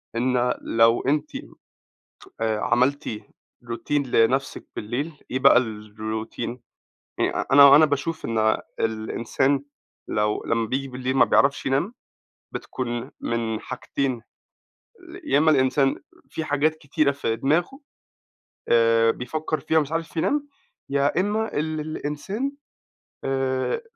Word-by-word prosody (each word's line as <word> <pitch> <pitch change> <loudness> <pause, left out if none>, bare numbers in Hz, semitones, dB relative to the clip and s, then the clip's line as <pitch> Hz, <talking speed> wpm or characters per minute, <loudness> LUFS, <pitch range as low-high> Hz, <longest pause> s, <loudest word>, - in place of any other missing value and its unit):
إن 125 +1 +1
لو 115 +1 +3
أنتِ 150 +2 0 1.1
آآ 110 -1 0
عملتِ 140 +6 +1 0.6
routine 125 +5 -2
لنفسِك 125 +3 +1
بالليل 125 +9 -3 0.2
إيه 130 - 0
بقى، 135 +1 +6
الroutine 110 +1 -5 0.6
يعني - - 0
أنا 140 0 +9
أنا 155 - +7
باشوف 155 +3 -2
إن 115 -1 -1
آآ 110 0 +1
الإنسان 115 +5 0 0.4
لو 105 0 0
لمّا 115 0 +1
بييجي 135 +4 -2
بالليل 130 +1 -3
ما - - +7
بيعرفش 140 0 +2
ينام 140 - 0 0.6
بتكون 120 +1 -4
من 115 -2 -2
حاجتين، 130 -1 -3 1.0
يا 295 - +2
إما 155 +1 +4
الإنسان 135 -1 +2 0.3
في 160 +3 -4
حاجات 150 +1 +1
كتيرة 150 -1 0
في 130 -5 -2
دماغه 175 - 0 0.9
آآ 115 -1 +4
بيفكر 155 +6 -3
فيها 160 +1 0
ومش 150 -2 +1
عارف 165 0 -3
ينام، 290 - 0 0.4
يا 140 +4 +1
إما 210 +3 -1
ال 155 +1 -1
الإنسان 155 - -3 0.7
آآ 135 - -1
135 Hz, 120 wpm, -24 LUFS, 115-150 Hz, 1.1 s, أنا